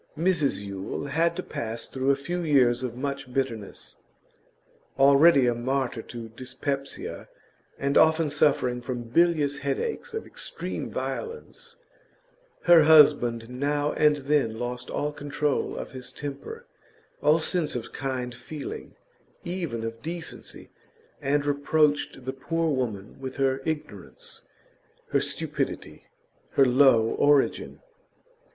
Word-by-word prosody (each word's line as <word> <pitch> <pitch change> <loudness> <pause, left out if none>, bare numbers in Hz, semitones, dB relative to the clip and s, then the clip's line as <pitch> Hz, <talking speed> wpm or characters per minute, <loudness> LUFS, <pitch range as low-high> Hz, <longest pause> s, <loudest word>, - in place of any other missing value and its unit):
Mrs 165 - +1
Yule 100 +6 -5
had 165 +4 +1
to 185 - -4
pass 115 -5 -4
through 130 +1 -1
a 140 - +5
few 170 +6 -4
years 130 -7 +3
of 125 -2 -4
much 140 0 -4
bitterness. 120 -6 -4 1.0
Already 140 +1 +6
a 120 - +3
martyr 125 0 -1
to 115 0 -8
dyspepsia, 135 +4 -5 0.5
and 140 +1 -1
often 160 -1 +4
suffering 135 -5 +2
from 120 -1 -4
bilious 145 +2 +2
headaches 145 - -3
of 445 - -4
extreme - - -6
violence, 465 0 -6 0.9
her 175 -2 +8
husband 140 -7 +6
now 145 +4 -1
and 150 -1 +4
then 135 -7 +1
lost 120 +1 -4
all 150 0 -2
control 145 0 -2
of - - -6
his 125 -1 -8
temper, 145 - -7 0.6
all 150 +2 +5
sense 165 -2 -1
of 120 - -5
kind 130 -2 -3
feeling, 140 +4 -8 0.5
even 170 -11 -3
of 115 0 -5
decency, 165 +2 -7 0.5
and 145 +1 +1
reproached 145 -2 +1
the 130 - -3
poor 165 +4 -1
woman 115 -7 -3
with 130 -1 -5
her 135 -1 +1
ignorance, 165 - -5 0.7
her - - +2
stupidity, - - -4 0.5
her 135 - +5
low 125 -3 +5
origin. 145 -1 +2
140 Hz, 120 wpm, -26 LUFS, 125-150 Hz, 1.0 s, her